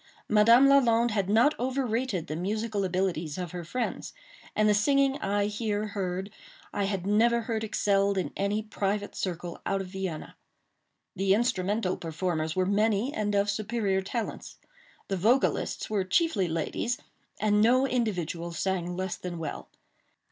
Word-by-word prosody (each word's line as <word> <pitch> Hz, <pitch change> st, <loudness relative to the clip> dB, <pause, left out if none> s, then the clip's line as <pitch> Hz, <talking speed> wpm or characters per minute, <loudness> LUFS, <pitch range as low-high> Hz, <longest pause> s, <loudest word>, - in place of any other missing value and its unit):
Madame 230 Hz, +5 st, +6 dB
Lalande 240 Hz, -4 st, +4 dB
had 200 Hz, -3 st, 0 dB
not 230 Hz, +8 st, +5 dB
overrated 250 Hz, -, -1 dB
the 155 Hz, -, -5 dB
musical 210 Hz, +4 st, -2 dB
abilities 180 Hz, -4 st, -1 dB
of 180 Hz, -3 st, -4 dB
her 175 Hz, -1 st, -5 dB
friends; 240 Hz, +9 st, -4 dB, 0.4 s
and 215 Hz, 0 st, +3 dB
the 210 Hz, -, +5 dB
singing 275 Hz, +5 st, +3 dB
I 200 Hz, -2 st, 0 dB
here 210 Hz, 0 st, -2 dB
heard 190 Hz, -1 st, -3 dB, 0.4 s
I 200 Hz, -, 0 dB
had 195 Hz, -2 st, -2 dB
never 230 Hz, +4 st, +3 dB
heard 225 Hz, -1 st, -2 dB
excelled 200 Hz, -2 st, +1 dB
in 185 Hz, -, -2 dB
any 205 Hz, +2 st, -1 dB
private 205 Hz, -1 st, -2 dB
circle 175 Hz, -2 st, -4 dB
out 195 Hz, -, 0 dB
of 195 Hz, -, -4 dB
Vienna. 190 Hz, -4 st, -5 dB, 0.8 s
The 195 Hz, +1 st, +3 dB
instrumental 210 Hz, -4 st, 0 dB
performers 160 Hz, -1 st, -2 dB
were 185 Hz, 0 st, +2 dB
many 210 Hz, +5 st, +1 dB
and 205 Hz, -1 st, -1 dB
of 200 Hz, 0 st, +2 dB
superior 205 Hz, -1 st, 0 dB
talents. 220 Hz, +4 st, -5 dB, 0.5 s
The 195 Hz, -, -1 dB
vocalists 235 Hz, +9 st, +1 dB
were 205 Hz, -3 st, 0 dB
chiefly 195 Hz, -, +1 dB
ladies, 165 Hz, +8 st, -2 dB, 0.4 s
and 210 Hz, -1 st, +3 dB
no 250 Hz, +4 st, +4 dB
individual 180 Hz, -, -2 dB
sang 180 Hz, -1 st, -2 dB
less 185 Hz, -1 st, -2 dB
than 180 Hz, -1 st, -6 dB
well. 160 Hz, -3 st, -6 dB
205 Hz, 150 wpm, -28 LUFS, 185-225 Hz, 0.8 s, Madame